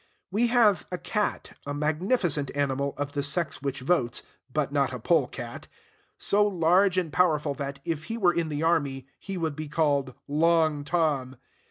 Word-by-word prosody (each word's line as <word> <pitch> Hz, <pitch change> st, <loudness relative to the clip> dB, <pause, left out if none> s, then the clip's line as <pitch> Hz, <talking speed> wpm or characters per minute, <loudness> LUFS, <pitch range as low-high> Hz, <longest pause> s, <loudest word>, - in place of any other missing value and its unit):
We 225 Hz, +5 st, +2 dB
have 220 Hz, -8 st, +3 dB
a 180 Hz, -, -2 dB
cat, 210 Hz, +3 st, -2 dB
a 145 Hz, 0 st, -4 dB
magnificent 155 Hz, -, 0 dB
animal, 140 Hz, 0 st, -1 dB
of 145 Hz, 0 st, -3 dB
the 145 Hz, -1 st, -2 dB
sex 145 Hz, 0 st, 0 dB
which 140 Hz, -2 st, -3 dB
votes 130 Hz, -4 st, +1 dB, 0.3 s
(but 150 Hz, 0 st, -1 dB
not 140 Hz, -1 st, +1 dB
a 125 Hz, -, -4 dB
pole 150 Hz, +2 st, +2 dB
cat), 120 Hz, -2 st, -8 dB, 0.5 s
so 205 Hz, +1 st, +3 dB
large 185 Hz, 0 st, +3 dB
and 170 Hz, -4 st, -1 dB
powerful 155 Hz, -5 st, +2 dB
that, 140 Hz, 0 st, -5 dB
if 160 Hz, -1 st, -3 dB
he 225 Hz, -, -4 dB
were 180 Hz, -6 st, +3 dB
in 165 Hz, -2 st, -1 dB
the 150 Hz, +1 st, -2 dB
army, 140 Hz, -6 st, +1 dB
he 195 Hz, -2 st, -6 dB
would 160 Hz, -4 st, -2 dB
be 155 Hz, 0 st, -5 dB
called 145 Hz, -4 st, 0 dB
Long 155 Hz, 0 st, +2 dB
Tom. 145 Hz, -5 st, 0 dB
155 Hz, 175 wpm, -27 LUFS, 140-175 Hz, 0.5 s, have